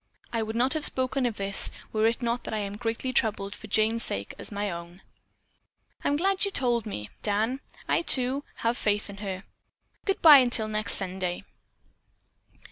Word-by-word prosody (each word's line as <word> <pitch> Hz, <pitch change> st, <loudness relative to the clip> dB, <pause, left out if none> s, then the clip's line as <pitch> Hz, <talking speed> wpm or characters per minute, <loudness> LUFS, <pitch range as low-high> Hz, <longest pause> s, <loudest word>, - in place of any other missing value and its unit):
I 230 Hz, -, 0 dB
would 220 Hz, 0 st, -4 dB
not 250 Hz, +4 st, +3 dB
have 310 Hz, -2 st, -1 dB
spoken 260 Hz, -2 st, +2 dB
of 225 Hz, -, -5 dB
this 195 Hz, 0 st, +3 dB, 0.2 s
were 215 Hz, 0 st, +3 dB
it 235 Hz, +2 st, -1 dB
not 235 Hz, +1 st, -1 dB
that -, -, -3 dB
I -, -, -1 dB
am 200 Hz, -1 st, -3 dB
as 205 Hz, -, -9 dB
greatly 230 Hz, +3 st, -2 dB
troubled 205 Hz, -4 st, 0 dB
for 220 Hz, -, -11 dB
Jane's 220 Hz, +2 st, +2 dB
sake 100 Hz, -, -4 dB
as -, -, -8 dB
my 205 Hz, 0 st, -2 dB
own." 170 Hz, +2 st, -9 dB, 1.0 s
"I -, -, 0 dB
am 285 Hz, -, +2 dB
glad 385 Hz, +3 st, +2 dB
you 400 Hz, -, +3 dB
told 240 Hz, -, 0 dB
me, 105 Hz, -, -6 dB
Dan. 220 Hz, +5 st, 0 dB, 0.3 s
I, -, -, +2 dB
too, 265 Hz, -2 st, +3 dB, 0.2 s
have 235 Hz, +1 st, +2 dB
faith 205 Hz, -1 st, 0 dB
in 200 Hz, -, -11 dB
her. 195 Hz, -2 st, -5 dB, 0.6 s
Goodbye 315 Hz, -8 st, +7 dB
till 225 Hz, -3 st, +2 dB
next 215 Hz, -1 st, -1 dB
Sunday." 185 Hz, -2 st, -3 dB
220 Hz, 185 wpm, -27 LUFS, 200-250 Hz, 1.0 s, Goodbye